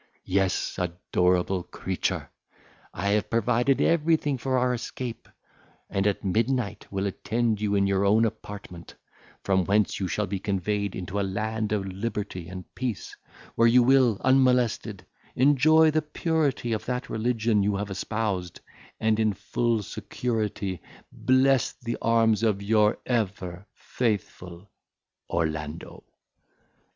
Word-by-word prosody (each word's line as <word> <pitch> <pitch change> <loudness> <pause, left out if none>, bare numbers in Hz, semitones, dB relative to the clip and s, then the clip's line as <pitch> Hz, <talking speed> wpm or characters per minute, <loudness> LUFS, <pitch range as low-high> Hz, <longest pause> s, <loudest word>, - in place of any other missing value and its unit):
Yes, 95 0 0
adorable 90 +1 0
creature! - - -3 0.6
I 100 +4 -2
have 105 +1 +1
provided 120 +3 +2
everything 155 -4 +2
for 130 +1 0
our 125 0 +2
escape, 120 -1 -6 0.6
and 95 +1 +1
at 100 - -1
midnight 110 +1 -1
will 100 0 -2
attend 110 +2 -1
you 100 -1 +1
in 100 0 +3
your 100 0 +1
own 110 +3 +4
apartment, 100 -5 -7 0.5
from 95 -1 +2
whence 100 +3 +1
you 95 - -1
shall 105 +5 -1
be 100 0 -3
conveyed 100 +1 -2
into 95 +2 -4
a - - +1
land 105 +3 -2
of 105 -2 0
liberty 95 -2 -4
and 90 0 -8
peace, 125 -5 -4 0.4
where 115 - +4
you 120 +1 +6
will, 125 -4 +4
unmolested, 125 -7 +2 0.3
enjoy 155 +4 +5
the 155 +1 +1
purity 150 -6 -1
of 110 - -3
that 125 0 -2
religion 115 -1 +1
you 100 0 +1
have 100 0 -3
espoused, 95 -3 -3 0.4
and 110 0 +2
in 110 -2 +2
full 115 +2 -1
security 105 -6 -3 0.3
bless 130 0 +2
the 120 -1 -5
arms 115 -2 +3
of 105 -3 +1
your 105 0 +3
ever 100 -5 -2
faithful, 95 -5 -3 0.6
ORLANDO." 80 -1 -3
105 Hz, 130 wpm, -26 LUFS, 95-120 Hz, 0.6 s, you